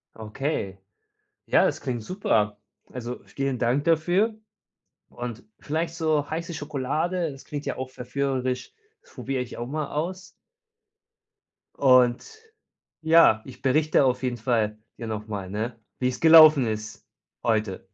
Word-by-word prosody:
Okay. 110 -2 -4 0.7
Ja, - - +4
das - - 0
klingt 120 -3 -3
super. 105 - 0 0.3
Also, 125 0 -6
vielen 135 -2 -3
Dank 125 +5 +1
dafür. 175 +7 +2 0.7
Und 120 -2 -7
vielleicht 160 +2 -3
so 155 -3 0
heiße 165 +1 -4
Schokolade, 155 +4 -2
das 135 - -13
klingt 145 -1 -6
ja - - -2
auch 130 0 -5
verführerisch. 130 - -3 0.3
Das - - -23
probiere 130 -1 -3
ich 125 - -9
auch 120 - -4
mal 150 +2 -3
aus. 180 +5 -4 1.5
Und, 130 - +3 0.6
ja, 160 -9 +5
ich 130 - -12
berichte 150 +2 +3
auf 125 0 0
jeden 125 -1 -1
Fall 110 -2 0 0.2
dir 115 - -6
noch 105 0 -5
mal, 100 -3 -5
ne, 110 +3 -4 0.2
wie's 125 -1 -1
gelaufen 155 -5 +8
ist 110 0 -6 0.4
heute. 110 -4 -1
130 Hz, 135 wpm, -25 LUFS, 115-155 Hz, 1.5 s, gelaufen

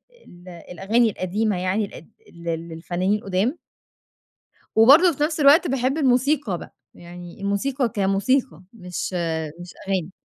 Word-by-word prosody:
ال 180 - -18
الأغاني 195 +7 0
القديمة 205 +1 -2
يعني 185 +4 -1
ال 165 - -12 0.3
ل 170 - -14 0.2
للفنانين 175 +4 -2
القُدام. 200 - -1 1.2
وبرضه 285 +11 +7
في 295 - 0
نَفْس 310 +1 -1
الوقت 295 +5 +6
باحب 265 +1 -1
الموسيقى 260 - +1
بَقى، - - -12 0.2
يعني 175 +1 -12
الموسيقى 235 +6 -1
كموسيقى 200 - 0
مش 180 -5 -6
آآ، 160 -3 -2
مش 175 0 -10
أغاني. 190 -3 -2
200 Hz, 130 wpm, -22 LUFS, 180-260 Hz, 1.2 s, وبرضه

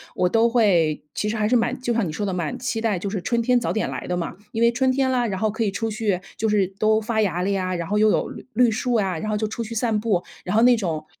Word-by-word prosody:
我 180 0 +2
都 225 +4 +3
会 190 -10 +2
其 210 - -1
实 215 - -1
还 215 -1 0
是 250 - +3
蛮 240 +1 0
就 240 - -1
像 230 -5 +1
你 - - -4
说 205 - -3
的， 195 - -1
蛮 170 -4 -3
期 240 -2 -2
待 220 -5 0
就 200 - -3
是 200 0 -3
春 235 -1 +1
天 245 +1 +3
早 235 - -2
点 220 - -1
来 - - -5
的 180 - -2
嘛。 175 -2 -4 0.2
因 225 - -3
为 235 0 +5
春 260 +2 +1
天 260 0 +1
啦， 250 -2 +1
然 195 -4 -2
后 215 +1 +1
可 220 +2 -2
以 205 - 0
出 225 +3 -2
去 210 -4 -1 0.2
就 220 - 0
是 205 -3 +2
都 215 0 +3
发 220 0 -1
芽 185 -4 +1
了 190 - 0
呀， 185 -2 -1
然 170 -1 -4
后 210 - 0
又 215 0 +4
有 - - 0
绿 - - -10
绿 245 +1 +4
树 240 +3 -1
啊。 195 -6 +1
然 215 +6 -3
后 - - 0
就 215 - -1
出 225 +2 -4
去 230 +1 -7
散 225 -2 0
步， 205 -5 0 0.2
然 180 - -2
后 225 - +5
那 245 +1 +6
种 165 -7 -3
215 Hz, 330 characters per minute, -23 LUFS, 190-230 Hz, 0.2 s, 那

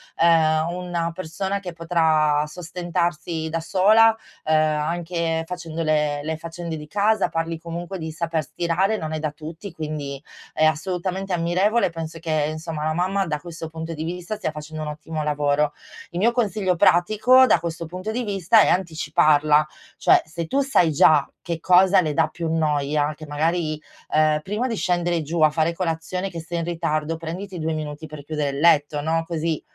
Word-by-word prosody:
ehm, 160 -1 +3
una 175 -1 -3
persona 185 +3 -3
che 180 -3 -7
potrà 160 -3 +2
sostentarsi 170 0 -3
da 165 +1 -2
sola, 215 +6 +5 0.3
ehm, 155 0 +2 0.2
anche 165 +1 -1
facendo 165 -2 -5
le 150 -2 +1
le 160 +1 -2
faccende 165 0 -6
di 150 0 -9
casa. 205 +6 +2
Parli 165 0 -3
comunque 170 +3 -6
di 160 -1 -5
saper 165 0 -2
stirare, 175 +7 0
non 155 -4 -4
è 155 - -2
da 155 0 -1
tutti, 160 +6 -9
quindi 150 -4 -5 0.3
è 155 - +2
assolutamente 180 +4 -1
ammirevole. 180 +5 +2
Penso 165 0 -6
che, 155 -2 0
insomma, 155 -1 -5
la 155 - 0
mamma 190 +3 0
da 150 -2 -2
questo 165 0 -8
punto 160 +1 -6
di 155 0 -5
vista, 175 +4 -4
stia 205 - -2
facendo 155 +1 -7
un 155 - -3
ottimo 155 +1 -5
lavoro. 150 0 +1 0.4
Il 170 - -7
mio 230 +5 +4
consiglio 210 -6 0
pratico, 215 +10 +5
da - - +4
questo 165 0 -5
punto 180 +5 -6
di 240 +3 -2
vista, 200 0 +3
è - - +4
anticiparla. 155 -3 +3 0.3
Cioè, - - +4
se 165 +1 -5
tu 275 - 0
sai 170 -9 +4
già 150 0 +5
che 170 -2 -4
cosa 185 +3 +5
le 155 -3 -1
dà 160 +1 +2
più 165 +1 -5
noia 150 -2 0
che 155 0 -11
magari, 155 +1 0 0.4
ehm, 155 0 +3
prima 210 +9 -2
di 230 - -2
scendere 175 -2 0
giù 160 +2 -3
a 155 - +7
fare 160 +2 0
colazione, 175 +2 -3
che 170 - -7
sei 170 +1 -4
in - - -2
ritardo, 165 -2 -2
prenditi 175 +3 -6
due 160 0 -1
minuti 155 0 -5
per 155 -2 -9
chiudere 150 -1 -2
il 140 - -5
letto 150 -2 +3
no, 165 +2 0
così 165 -2 -2
165 Hz, 180 wpm, -23 LUFS, 155-180 Hz, 0.4 s, a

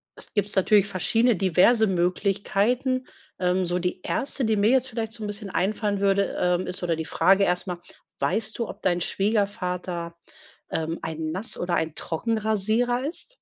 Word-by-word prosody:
es - - -13
gibt's 205 0 0
natürlich 200 +1 +4
verschiedene 225 +5 +2
diverse 195 +5 +4
Möglichkeiten. 200 +8 0 0.3
Ähm, 180 0 +1
so 175 +1 -1
die 180 +1 -2
erste, 275 -1 0
die 220 -1 +2
mir 205 +1 +3
jetzt 260 +1 +3
vielleicht 225 -2 -4
so 225 -2 -8
'n 210 - -2
bisschen 205 -1 -5
einfallen 200 +3 0
würde, 200 0 +1
ähm, 180 0 +1
ist 180 0 -5
oder 170 -2 +1
die 160 0 -4
Frage 195 +5 +3
erst 180 +1 -1
mal: 180 -1 -4 0.4
Weißt 215 +10 -1
du, 235 - -1
ob - - -9
dein 175 -1 +1
Schwiegervater, 180 -4 -1 0.6
ähm, 165 +1 -2
ein 160 -1 -4
Nass 190 +6 -2
oder 175 0 -1
ein 160 -2 -1
Trockenrasierer 220 - 0
ist? 345 +9 -3
195 Hz, 170 wpm, -25 LUFS, 180-220 Hz, 0.6 s, natürlich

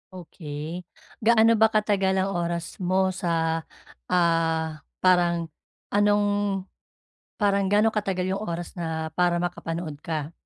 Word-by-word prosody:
Okey, 155 -4 -8 0.6
gaano 225 0 +6
ba 220 - +8
katagal 200 -3 +2
ang 190 +1 0
oras 170 0 -2 0.2
mo 190 0 +2
sa, 175 - -1 0.8
ah, 165 -3 +1 0.2
parang 175 -2 +3 0.5
anong 205 0 +4 1.1
parang 200 -2 +2
gaano 210 +2 +4
katagal 195 -3 -1
yung 195 +2 -2
oras 175 -3 -5
na 160 -2 -3
para 175 -1 +3
makapanood 165 -2 -4
ka? 155 -3 -3
175 Hz, 115 wpm, -25 LUFS, 165-195 Hz, 1.1 s, ba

